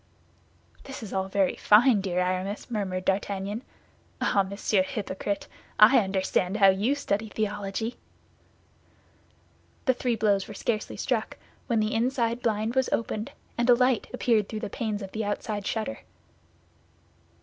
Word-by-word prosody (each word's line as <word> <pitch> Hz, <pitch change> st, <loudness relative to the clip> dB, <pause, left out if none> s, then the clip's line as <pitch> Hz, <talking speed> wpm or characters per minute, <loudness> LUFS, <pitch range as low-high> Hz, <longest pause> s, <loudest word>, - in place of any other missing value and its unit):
"This 270 Hz, -3 st, -8 dB
is 210 Hz, -, -7 dB
all 190 Hz, 0 st, -1 dB
very 195 Hz, -1 st, +1 dB
fine, 220 Hz, 0 st, +5 dB
dear 180 Hz, -2 st, -1 dB
Aramis," 185 Hz, +5 st, -2 dB
murmured 185 Hz, -4 st, -2 dB
D'Artagnan. 200 Hz, +2 st, -1 dB, 0.6 s
"Ah, 200 Hz, -, +3 dB
Monsieur 200 Hz, +1 st, 0 dB
Hypocrite, 200 Hz, 0 st, -3 dB, 0.3 s
I 215 Hz, +5 st, +8 dB
understand 190 Hz, -1 st, 0 dB
how 195 Hz, -2 st, +7 dB
you 205 Hz, +9 st, +2 dB
study 220 Hz, -5 st, -2 dB
theology." 210 Hz, +2 st, -3 dB, 1.9 s
The 260 Hz, -, +4 dB
three 245 Hz, -1 st, -1 dB
blows 205 Hz, -3 st, +1 dB
were 210 Hz, -, -9 dB
scarcely 215 Hz, +1 st, -2 dB
struck, -, -, -2 dB, 0.3 s
when 235 Hz, -3 st, +2 dB
the 215 Hz, 0 st, 0 dB
inside 235 Hz, 0 st, 0 dB
blind 220 Hz, -1 st, 0 dB
was 260 Hz, 0 st, +1 dB
opened 225 Hz, +2 st, -2 dB, 0.3 s
and 240 Hz, +1 st, +2 dB
a 245 Hz, -, +8 dB
light 250 Hz, -2 st, +2 dB
appeared 230 Hz, -5 st, +1 dB
through 215 Hz, -1 st, -5 dB
the -, -, -5 dB
panes 215 Hz, -3 st, -3 dB
of 190 Hz, -, -8 dB
the 220 Hz, -, -3 dB
outside 205 Hz, 0 st, -3 dB
shutter. 225 Hz, +5 st, -2 dB
210 Hz, 140 wpm, -27 LUFS, 195-230 Hz, 1.9 s, I